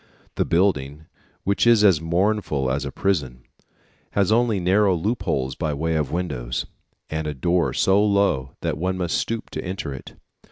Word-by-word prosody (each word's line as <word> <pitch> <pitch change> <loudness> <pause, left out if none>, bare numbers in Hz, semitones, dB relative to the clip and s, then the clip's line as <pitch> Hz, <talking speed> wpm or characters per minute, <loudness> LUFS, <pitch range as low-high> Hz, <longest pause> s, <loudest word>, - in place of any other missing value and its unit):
The - - 0
building, 80 -5 0 0.4
which 100 +4 +1
is 115 -3 +6
as 95 -7 +5
mournful 85 -5 0
as 70 +1 -1
a - - -4
prison, 70 -11 -1 0.7
has 100 0 +2
only 115 -3 +2
narrow 95 +2 +3
loopholes 80 - -1
by 75 -1 -2
way 80 +3 -1
of 75 -4 -1
windows, 65 -9 -3 0.5
and 80 0 -2
a 75 - -3
door 85 +6 +1
so 100 +2 +3
low 100 -11 +1
that 80 -3 -2
one 90 +2 -1
must 90 -2 -1
stoop 115 0 -3
to - - -5
enter 90 -6 -4
it. 65 - -10
85 Hz, 165 wpm, -23 LUFS, 75-100 Hz, 0.7 s, is